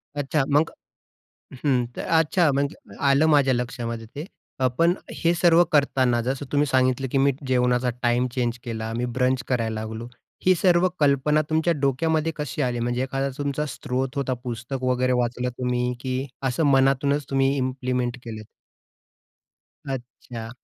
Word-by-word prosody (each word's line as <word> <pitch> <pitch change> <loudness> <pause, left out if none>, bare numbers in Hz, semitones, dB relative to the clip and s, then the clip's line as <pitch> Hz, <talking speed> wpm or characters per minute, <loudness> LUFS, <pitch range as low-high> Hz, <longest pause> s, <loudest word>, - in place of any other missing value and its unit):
अच्छा 145 0 0
मग? 150 +3 +3 0.9
हं. 125 -4 +3
तर, - - -4 0.2
अच्छा 165 0 +3
मग 140 +2 0 0.3
आलं 140 +2 +4
माझ्या 145 -4 +4
लक्षामध्ये 120 -1 -3
ते. 150 - -5 0.5
पण 170 +1 +4 0.2
हे 170 +1 +2
सर्व 170 0 +5
करतांना 130 -5 +2
जसं 135 +3 -3
तुम्ही 145 0 +3
सांगितलं, 130 0 +2
की 135 - +1
मी 140 +1 +4 0.2
जेवणाचा 125 -1 +2
टाईम 120 +1 +2
चेंज 120 -1 0
केला, 110 -2 -4
मी 120 - -1
ब्रंच 130 0 +1
करायला 115 -3 -1
लागलो. 110 +2 -6 0.4
ही 185 - +6
सर्व 180 +1 +4
कल्पना 145 +1 +3
तुमच्या 160 +2 +2
डोक्यामध्ये 160 +4 +1
कशी 150 0 -4
आली 125 -3 0
म्हणजे 120 +2 -1
एखादा 135 +1 -2
तुमचा 145 +1 -2
स्रोत 130 0 -3
होता 135 -2 0
पुस्तक 125 +2 -5
वगैरे 130 0 +1
वाचलं 125 +1 -2
तुम्ही 125 0 0
की 130 +1 -2 0.2
असं 130 +5 0
मनातूनच 135 +2 +2
तुम्ही 135 0 +2
इम्प्लिमेंट 130 -1 -1
केलं? 110 -2 -6 1.4
अच्छा. 120 -3 -7
130 Hz, 145 wpm, -24 LUFS, 125-145 Hz, 1.4 s, ही